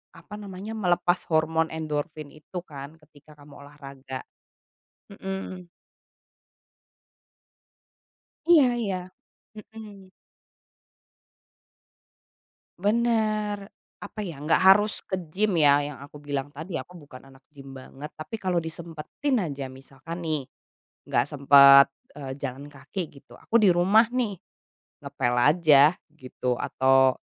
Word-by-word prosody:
apa 210 - -11
namanya, 200 +1 -8
melepas 175 -3 +1
hormon 160 +1 +2
endorfin 155 -1 -4
itu 155 +4 -8
kan 140 +3 -9
ketika 150 0 -20
kamu 145 -1 -15
olahraga. 135 -2 -9 0.9
Mhm. 190 -2 -7 2.8
Iya 315 -6 +7
iya. 200 -5 -2 0.6
Mhm. 210 -3 -12 2.7
Benar. 215 -1 0 0.3
Apa 210 +1 -10
ya, 175 -8 -6
enggak 155 - +3
harus 205 +3 +5
ke 190 - -4 0.2
gym, 200 +1 0
ya. 145 -3 +5
Yang 145 -1 -6
aku 150 - -14
bilang 145 -1 -4
tadi, 160 +5 -7
aku 180 - -6
bukan 135 -2 -14
anak 135 0 -19
gym 140 -2 -13
banget, 135 +2 -10
tapi 155 +7 -7
kalau 185 -4 0
disempetin 165 - -4
aja, 140 -5 -4
misalkan 135 +5 -10
nih, 155 -4 -2 0.7
enggak - - +2
sempet, 140 -1 +7 0.3
eee, 135 -3 -7
jalan 140 +1 -6
kaki 155 +4 -6
gitu, - - -21
aku 230 - -1
di 200 -5 +5
rumah 195 +6 +4
nih, 235 -6 -1 0.7
ngepel 120 0 -1
aja 150 +2 +5 0.2
gitu 130 -3 -3
atau 130 0 +2
155 Hz, 110 wpm, -25 LUFS, 140-195 Hz, 2.8 s, Iya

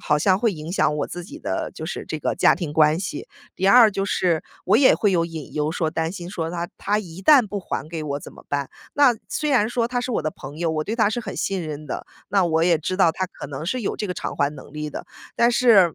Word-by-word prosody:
好 150 - +1
像 185 +5 +3
会 225 0 +2
影 155 -1 -7
响 150 - +2
我 - - -1
自 175 0 -7
己 285 - -10
的 - - -3
就 - - -6
是 - - -5
这 - - -4
个 - - -1
家 - - +5
庭 165 -5 -4
关 155 +1 +4
系。 185 - -5 0.3
第 190 - -1
二 225 +2 +8
就 195 -1 -2
是， 175 -5 +1 0.2
我 200 - +4
也 260 +2 +6
会 205 - +2
有 170 -3 +2
隐 165 -3 -7
忧 150 +1 0
说 160 -2 -1
担 165 +1 -2
心 175 -3 -7
说， 165 -4 -3
他 175 0 -3
他 205 +1 0
一 185 -3 -8
旦 265 +1 +6
不 205 0 -4
还 155 -5 -4
给 160 -1 -5
我 145 -1 -3
怎 - - -11
么 - - -15
办？ 140 -1 -1 0.3
那 280 -4 +5
虽 300 -1 -1
然 235 -6 +3
说 235 -1 0
他 245 0 -1
是 250 - -3
我 - - 0
的 155 - -1
朋 145 +1 -10
友， 170 -1 0
我 155 -1 -1
对 215 - -2
他 220 -3 +4
是 240 - -2
很 - - -7
信 195 -3 -1
任 155 -1 -6
的， 130 - -5 0.2
那 195 -2 +3
我 160 -1 +2
也 175 -1 +4
知 185 +4 -3
道 175 -4 +4
他 185 - -2
可 - - -9
能 140 +1 -6
是 250 +9 -1
有 210 - -2
这 210 - -3
个 180 - -3
偿 - - -4
还 140 0 +2
能 145 - -12
力 150 0 -4
的。 - - -7 0.3
但 235 0 +4
是， 210 -9 +5
175 Hz, 295 characters per minute, -23 LUFS, 155-210 Hz, 0.3 s, 二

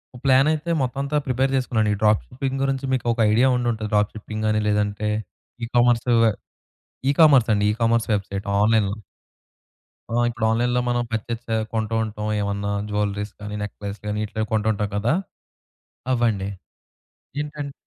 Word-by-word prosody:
ఓహ్! 120 - -11
ప్లానయితే 150 +5 +3
మొత్తం 130 +1 -2
అంతా 150 +2 -1
ప్రిపేర్ 130 +1 +1
చేసుకున్నానండి. 110 -5 +1
ఈ - - -9
డ్రాప్ 105 0 +4
షిప్పింగ్ 135 +1 -3
గురించి 135 0 -1
మీకు 130 - -1
ఒక - - -9
ఐడియా 120 +5 +4
ఉండుంటది 115 -3 -2
డ్రాప్ 105 0 +2
షిప్పింగ్ 110 0 -5
అని, 110 0 +1
లేదంటే 105 0 0 0.5
ఈ - - -2
కామర్స్ 120 0 +3 1.0
ఈ - - +5
కామర్స్ 135 -7 +6
అండి 105 0 +1
ఈ - - -1
కామర్స్ 115 0 +2
వెబ్‌సైట్‌ 100 0 -3
ఆన్‌లైన్‌లో. 105 -1 +3 1.2
ఆ! - - +2
ఇప్పుడు 120 -1 -2
ఆన్‌లైన్‌లో 120 +2 +1
మనం 120 0 +1
పర్చస్ 115 +1 -3
చే 115 - 0 0.2
కొంటూ 110 0 -1
ఉంటాం. 105 -1 -4
ఏమన్నా 100 0 -2 0.2
జ్యువెల్లరీస్ 105 0 -2
గాని, 105 0 -5
నెక్లెస్ 100 0 -6
గాని 105 0 -2
ఇట్లా 110 +1 -3
కొంటూ 110 0 +1
ఉంటాం 105 0 -2
కదా! 115 +8 +1 1.0
అవ్వండి. 110 -5 +1 0.9
ఏంటంట్ 145 -1 -5
110 Hz, 155 wpm, -23 LUFS, 105-125 Hz, 1.2 s, కామర్స్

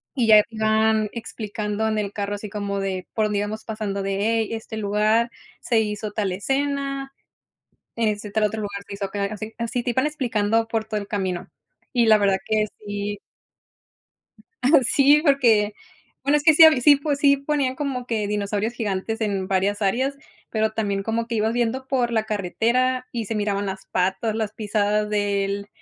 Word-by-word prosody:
y 240 -4 +1
ya 215 -1 +8
iban 220 -1 +2
explicando 220 -2 -4
en 215 - 0
el 205 -1 -2
carro, 205 0 -3
así 205 0 -7
como 200 -1 -3
de 190 -2 -3
por 220 - +1
dónde 210 -1 0
íbamos 215 +1 -4
pasando, 215 -3 -3
de: 195 0 -2
"Hey, 225 0 +1
este 225 -1 -6
lugar 215 +3 +2 0.3
se 225 -2 +1
hizo 210 0 -3
tal 205 -2 -1
escena, 275 +5 -2 0.9
en 230 -1 +1
este 210 0 -3
tal 215 +1 +1
otro 215 +1 -1
lugar, 200 -1 -5
se - - -7
hizo 200 0 -3
acá". 200 +1 -3
Así 215 +1 -7
así 235 +1 -2
te 245 - -1
iban 260 +5 +1
explicando 225 -6 0
por 225 -1 -1
todo 215 -1 -3
el 200 - -7
camino. 190 -4 -3 0.4
Y 240 -3 +3
la 215 -1 +6
verdad 200 -1 +3
que 215 -1 +1 0.2
sí 205 0 -3 1.4
Ajá 275 +3 +6
sí, 285 +4 +5
porque, 230 -7 +4 0.5
bueno, 285 +2 +3
es 290 - -3
que 315 - +7
sí 325 - +8
hab 315 - +8
sí 285 +2 +7
po 285 0 -1
sí 280 0 +4
ponían, 275 -2 -1
como 265 -3 -3
que 220 -4 -1
dinosaurios 210 +2 -1
gigantes 220 0 -3
en 195 -3 -1
varias 200 +2 0
áreas, 260 +8 0 0.3
pero 220 -1 0
también 200 -3 -1
como 230 +2 -2
que 235 - -3
ibas 220 +1 +1
viendo 245 +2 -1
por 245 -3 0
la 220 -2 +1
carretera 235 +5 0
y 230 -2 -3
se 225 - -3
miraban 205 -1 -1
las 190 0 -5
patas, 190 +4 0
las 220 -2 -2
pisadas 210 0 0
del 200 -1 -1
215 Hz, 185 wpm, -23 LUFS, 205-235 Hz, 1.4 s, ya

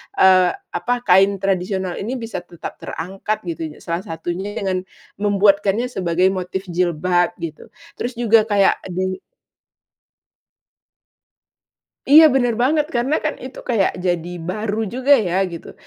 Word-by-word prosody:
eee, 185 -1 +6 0.2
apa, 245 +7 -1
kain 195 +1 +5
tradisional 190 -1 -1
ini 230 +6 -3
bisa 230 -5 -5
tetap 175 -1 -9
terangkat 195 +5 -4
gitu, 170 -2 -5 0.2
salah 170 +2 -4
satunya 175 +5 -5
dengan 185 -2 -2 0.3
membuatkannya 205 +2 +2
sebagai 180 -3 +1
motif 190 0 -4
jilbab, 175 0 +1
gitu. 160 -2 -7 0.3
Terus 245 +2 -3
juga 225 -2 +4
kayak 200 -2 +2
di 185 +1 -2 2.9
Iya 310 +3 +8
benar 250 -3 +2
banget, 280 +7 +2
karena 255 +6 +1
kan 310 - -2
itu 260 +1 -9
kayak 220 -7 +1
jadi 175 -1 -2
baru 210 +6 -3
juga 260 +6 +3
ya, 190 -4 0
gitu. 170 -2 -9
195 Hz, 125 wpm, -20 LUFS, 180-230 Hz, 2.9 s, Iya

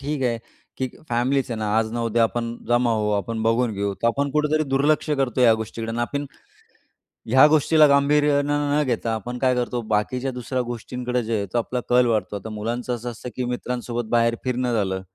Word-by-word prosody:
ठीक 145 0 -3
आहे, 120 -2 0 0.4
की 130 - -2 0.2
फॅमिलीच 130 +3 0
आहे 115 - -3
ना, 105 -1 -2
आज 110 -1 0
न 120 - -3
उद्या 115 0 +1
आपण 115 +1 -1
जमा 120 0 +3
होऊ, 105 -1 0
आपण 110 +2 -2
बघून 115 +1 +2
घेऊ. 100 0 -1
तर 115 - -2
आपण 140 +4 0
कुठेतरी 150 +1 +1
दुर्लक्ष 145 +3 +1
करतो 135 -3 0
या 115 -2 +7
गोष्टीकडे 115 +1 -5
आणि 115 - -2
आपण 140 +4 -2 1.0
ह्या 130 +4 +7
गोष्टीला 155 0 +5
गांभीर्यानं 145 0 +2
न 150 - +3
घेता 115 -2 -1
आपण 120 +3 -4
काय 130 -1 +2
करतो, 125 0 -1
बाकीच्या 125 +5 -1
दुसऱ्या 125 +1 -3
गोष्टींकडे 125 +1 -3
जे 115 +1 -1
आहे 100 - -2
तो - - +1
आपला 125 +2 -1
कल 125 0 +5
वाढतो. 105 -4 0
आता 110 +3 -8
मुलांचं 120 +4 -3
असं 120 +1 -6
असतं 120 +2 -8
की 125 - -2
मित्रांसोबत 120 -1 -3
बाहेर 115 0 +2
फिरणं 125 -1 -1
झालं, 95 -4 -1
120 Hz, 200 wpm, -23 LUFS, 115-135 Hz, 1.0 s, या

